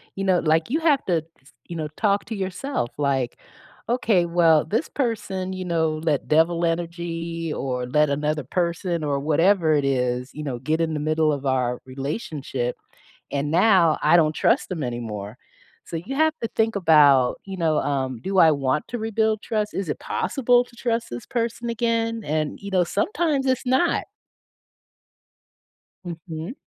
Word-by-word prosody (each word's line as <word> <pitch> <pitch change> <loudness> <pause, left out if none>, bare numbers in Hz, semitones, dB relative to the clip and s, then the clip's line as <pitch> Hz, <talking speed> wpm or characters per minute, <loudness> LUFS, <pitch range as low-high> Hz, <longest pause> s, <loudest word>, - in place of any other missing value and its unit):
you 195 - -3
know, 185 -2 +3
like, 160 +4 +1
you 310 +5 +1
have 300 -4 +3
to 175 -3 +2 0.2
s 130 - -21 0.2
you 170 - -7
know, 155 -2 -3
talk 200 -2 +2
to 225 - -5
yourself 190 - -3
like, 135 -4 0 0.5
"Okay, 225 -7 +2
well, 170 -2 +4
this 225 +9 -1
person, 195 -7 -2
you 185 0 -5
know, 160 -3 0
let 150 -4 0
devil 165 +2 +3
energy 165 -1 -3
or 125 -3 -3
let 150 +3 +3
another 150 +1 -1
person 170 +2 -1
or 140 -2 0
whatever 160 +3 +3
it 145 -2 +2
is, 125 -1 0
you 150 - -5
know, 125 -4 -4
get 155 +5 -1
in 160 -1 0
the 150 - -2
middle 155 0 +1
of 140 -1 -5
our 125 -2 0
relationship, 135 - -4 0.6
and 145 +1 -1
now 175 -2 +4
I 155 +3 +5
don't 155 -2 +3
trust - - +1
them 170 -6 -3
anymore." 115 -3 -5 0.5
So 165 - -5
you 200 +12 -5
have 315 +2 +3
to 230 - -1
think 225 0 0
about, 145 -8 +5
you 195 -1 -6
know, 160 -3 +1
um, 130 -3 -2
"Do 195 +7 -2
I 165 -3 +7
want 140 0 0
to 245 - -3
rebuild 220 0 0
trust? 215 -2 -2
Is 190 -4 -3
it - - -3
possible 245 -3 +1
to 245 - -20
trust 235 -1 -2
this 120 0 -7
person 235 -1 -2
again?" 230 0 0
And, 155 -1 -2
you 200 - -6
know, 185 -2 +3
sometimes 290 - 0
it's 260 0 0
not. 260 +7 +2 2.0
Mhm. 165 +2 -6
165 Hz, 170 wpm, -23 LUFS, 145-210 Hz, 2.0 s, I